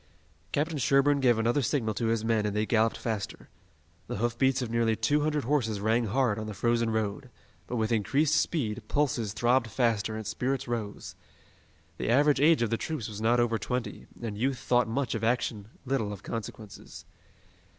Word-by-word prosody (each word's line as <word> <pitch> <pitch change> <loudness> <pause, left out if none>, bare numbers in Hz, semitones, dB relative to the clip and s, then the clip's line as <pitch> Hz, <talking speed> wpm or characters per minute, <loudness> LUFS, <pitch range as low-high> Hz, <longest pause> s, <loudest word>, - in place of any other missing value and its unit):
Captain 150 +1 -1
Sherburne 140 +3 +3
gave 125 -4 +4
another 120 +5 +2
signal 115 -3 0
to 115 +3 -1
his 115 -1 0
men 110 -2 +1
and 105 - -3
they 105 +1 +1
galloped 115 0 +2
faster. 110 -4 -4 0.6
The - - -4
hoofbeats 120 +4 +1
of 115 - -5
nearly 115 -1 +2
two 145 +7 +1
hundred 150 -1 0
horses 115 -6 0
rang 110 +3 +1
hard 115 -1 +1
on 110 - -5
the 105 - -6
frozen 115 0 +1
road, 110 +4 -2 0.4
but 125 - -4
with 110 -1 0
increased 135 +8 +2
speed 145 -9 0
pulses 130 -8 0
throbbed 120 +3 +2
faster 110 -2 0
and 110 0 -5
spirits 130 +5 -2
rose. 115 -4 -4 0.8
The - - -2
average 140 +3 +4
age 155 -4 +5
of 115 - -1
the 115 - +1
troops 155 -7 -4
was 105 -1 -7
not 120 +2 +3
over 115 -2 +1
twenty, 125 -1 -4
and 115 -3 -4
youth 130 +5 0
thought 120 -1 +2
much 130 +3 -1
of 115 -2 -3
action, 115 -3 0 0.2
little 120 -6 -1
of 105 -1 -8
consequences. 110 -2 -8
115 Hz, 180 wpm, -28 LUFS, 110-135 Hz, 0.8 s, age